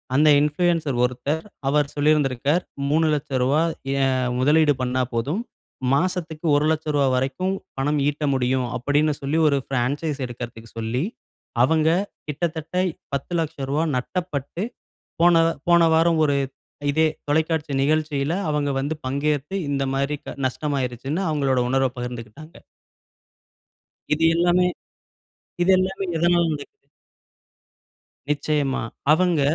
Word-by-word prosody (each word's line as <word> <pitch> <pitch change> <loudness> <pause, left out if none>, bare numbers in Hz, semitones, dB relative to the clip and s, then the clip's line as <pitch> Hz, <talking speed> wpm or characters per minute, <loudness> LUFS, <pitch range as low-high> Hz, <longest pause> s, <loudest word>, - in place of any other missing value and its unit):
அந்த 150 +2 +5
இன்ஃப்ளூயன்சர் 150 -2 +1
ஒருத்தர், 130 +6 -1 0.2
அவர் 145 +1 +2
சொல்லியிருந்திருக்கார், 145 +1 +2 0.3
ரூ.300000 145 -2 +1 0.4
ஏன் 135 - +3 0.3
முதலீடு 150 +3 +4
பண்ணா 130 0 0
போதும். 140 - -1 0.5
மாசத்துக்கு 170 0 -1
ரூ.100000 150 -1 +1
வரைக்கும், 140 +9 -1 0.2
பணம் 145 +2 +1
ஈட்ட 150 +1 -1
முடியும் 130 -1 +1
அப்பிடின்னு 145 +4 +1
சொல்லி, 140 +3 -1
ஒரு 140 -2 +3
பிரான்சைஸ் 140 +4 -1
எடுக்கிறதுக்கு 120 -2 -8
சொல்லி, 115 +4 -1 0.6
அவங்க 160 +3 +3 0.4
கிட்டத்தட்ட, 160 +2 -3 0.4
ரூ.1000000 145 -1 -1
நட்டப்பட்டு, 170 +2 -3 0.6
போன 175 0 +6 0.3
போன 170 0 +6
வாரம் 165 0 +3
ஒரு 145 -1 +2 0.6
இதே 160 +2 +3 0.2
தொலைக்காட்சி 155 0 0
நிகழ்ச்சியில, 150 0 0 0.2
அவங்க 145 -1 0
வந்து 145 +4 -2
பங்கேத்து 145 +4 -1
இந்தமாரி 140 +1 -1 0.3
நஷ்டமாயிருச்சுன்னு, 135 +2 -2
அவுங்களோட 140 -4 +1
உணர்வ 135 0 +2
பகிர்ந்துக்கிட்டாங்க. 120 +5 -8 1.6
இது 155 +2 0
எல்லாமே 175 +1 +3 1.0
இது 180 +2 +4
எல்லாமே 190 +1 -1
எதனால் 170 0 +3
நடக்குது? 145 -1 -10 1.4
நிச்சயமா! 145 -2 0 0.3
அவங்க, 170 -1 +3
150 Hz, 100 wpm, -23 LUFS, 135-160 Hz, 1.6 s, போன